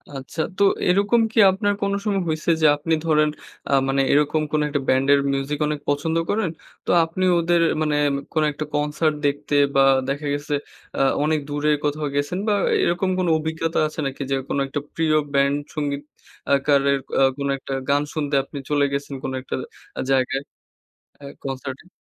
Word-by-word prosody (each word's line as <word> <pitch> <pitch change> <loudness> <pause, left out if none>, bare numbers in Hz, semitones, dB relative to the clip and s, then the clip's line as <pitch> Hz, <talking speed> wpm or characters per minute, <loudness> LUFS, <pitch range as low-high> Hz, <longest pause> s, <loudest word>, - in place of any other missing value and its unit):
আচ্ছা, 135 +4 -5 0.2
তো - - +3 0.3
এরকম 205 +5 +3
কি 225 - +1
আপনার 205 +2 0
কোন 200 0 0
সময় 200 -2 +1
হইছে 155 +1 -2
যে - - +4
আপনি 160 +2 -1
ধরেন 155 -1 +3 0.4
আ - - -1 0.2
মানে 135 0 +2
এরকম 150 +2 +2
কোন 155 - +1
একটা 145 -1 -1
ব্যান্ডের 135 +2 +4
মিউজিক 140 +2 -2
অনেক 150 -1 -2
পছন্দ 150 +3 0
করেন। 210 -4 0 0.4
তো - - -6 0.2
আপনি 165 +3 -4 0.2
ওদের 170 0 +2 0.2
মানে 150 -1 +1 0.4
কোন 155 -2 +2
একটা 155 +2 -5
কনসার্ট 150 +1 0
দেখতে 145 +1 -1 0.2
বা 135 - +5 0.3
দেখা 145 +2 -2
গেছে 145 +1 -3 0.4
আ - - +1 0.2
অনেক 155 0 +1
দূরে 145 +1 0
কোথাও 150 0 -1
গেছেন 145 +5 -1
বা 210 - +3 0.3
এরকম 175 +2 +1
কোন 180 - 0
অভিজ্ঞতা 160 +1 -2
আছে 155 - -9
নাকি 135 +1 -4
যে 135 - +3
কোন - - -1
একটা 145 - -3 0.2
প্রিয় 160 -1 +2 0.2
ব্যান্ড 140 0 +3 0.2
সংগীত 145 -2 -2 0.5
আকারের 140 0 +2 0.2
আ - - +4 0.2
কোনো 140 0 -2
একটা 135 - -6 0.2
গান 140 +1 +3
শুনতে 145 -2 -1
আপনি 140 - -10
চলে 145 -1 +3
গেছেন 140 0 -3
কোন 130 - -3
একটা 130 - -4 0.4
আ - - 0
জায়গায় 135 0 +1 0.8
আ - - -10 0.2
কনসার্ট 135 0 -5
এ? - - -24
150 Hz, 175 wpm, -22 LUFS, 140-160 Hz, 0.8 s, বা